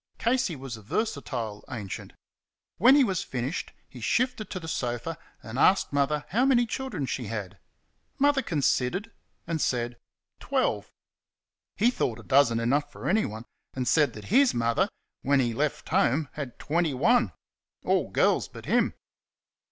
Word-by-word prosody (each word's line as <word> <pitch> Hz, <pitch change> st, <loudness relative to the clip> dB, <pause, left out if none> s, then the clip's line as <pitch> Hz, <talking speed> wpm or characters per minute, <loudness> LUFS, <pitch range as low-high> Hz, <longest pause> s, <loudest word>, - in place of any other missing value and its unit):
Casey 240 Hz, -7 st, +1 dB
was 130 Hz, -4 st, -7 dB
a -, -, -12 dB
versatile 120 Hz, -, -3 dB
ancient. 105 Hz, -6 st, -6 dB, 0.6 s
When 255 Hz, +4 st, +7 dB
he 285 Hz, -, +6 dB
was 190 Hz, -7 st, 0 dB
finished 130 Hz, +5 st, -4 dB, 0.2 s
he -, -, -12 dB
shifted 240 Hz, -4 st, 0 dB
to 185 Hz, -, -4 dB
the 165 Hz, -, -8 dB
sofa 125 Hz, +2 st, -2 dB, 0.3 s
and 115 Hz, +3 st, -5 dB
asked 190 Hz, -3 st, +4 dB
Mother 145 Hz, +1 st, +1 dB
how 230 Hz, +8 st, +2 dB
many 255 Hz, -3 st, +4 dB
children 225 Hz, -, -3 dB
she 125 Hz, -2 st, -3 dB
had. 105 Hz, -4 st, -5 dB, 0.6 s
Mother 285 Hz, 0 st, +3 dB
considered 160 Hz, -, 0 dB, 0.3 s
and 165 Hz, -2 st, -2 dB
said, 120 Hz, -1 st, -1 dB, 0.4 s
"Twelve." -, -, -1 dB, 0.8 s
He 230 Hz, +5 st, +3 dB
thought 120 Hz, -, -1 dB
a -, -, -11 dB
dozen 130 Hz, -2 st, +4 dB
enough 145 Hz, +5 st, +1 dB
for -, -, -7 dB
anyone, 120 Hz, -, 0 dB, 0.3 s
and, 130 Hz, -1 st, -2 dB
said 150 Hz, -3 st, +3 dB
that 105 Hz, -1 st, -9 dB
HIS 270 Hz, +1 st, +5 dB
mother, 115 Hz, 0 st, +1 dB, 0.3 s
when 140 Hz, +1 st, +3 dB
he 120 Hz, -3 st, +1 dB
left 145 Hz, +5 st, -2 dB
home, 140 Hz, +3 st, +2 dB
had 140 Hz, -5 st, -6 dB
twenty 160 Hz, -2 st, 0 dB
one 240 Hz, -, +3 dB, 0.5 s
all -, -, +2 dB
girls -, -, +2 dB
but -, -, -11 dB
him. -, -, +2 dB
145 Hz, 150 wpm, -27 LUFS, -, 0.8 s, When